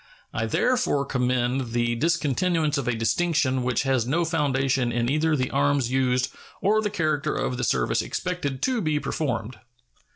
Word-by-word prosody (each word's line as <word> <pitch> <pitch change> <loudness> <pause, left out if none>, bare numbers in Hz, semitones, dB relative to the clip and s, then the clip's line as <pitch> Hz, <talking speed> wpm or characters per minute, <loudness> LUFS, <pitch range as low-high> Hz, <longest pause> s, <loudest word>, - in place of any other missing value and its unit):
I - - -1
therefore 250 - +1
commend 125 -1 0
the 120 0 +1
discontinuance 155 +2 +1
of 135 - -4
a 125 - +1
distinction 130 +2 +1
which 125 0 0
has 130 -4 +1
no 165 +6 +1
foundation 135 -5 +1
in 120 +1 0
either 155 +1 +2
the 130 -3 -1
arms 140 -3 +1
used 130 -1 +1 0.3
or 215 +3 +2
the 210 - -1
character 155 -4 -1
of 125 - -2
the 125 - -2
service 65 - +1
expected 145 -7 -3
to 255 -3 +1
be 155 -4 0
performed. 125 -7 -3
135 Hz, 160 wpm, -25 LUFS, 125-160 Hz, 0.3 s, either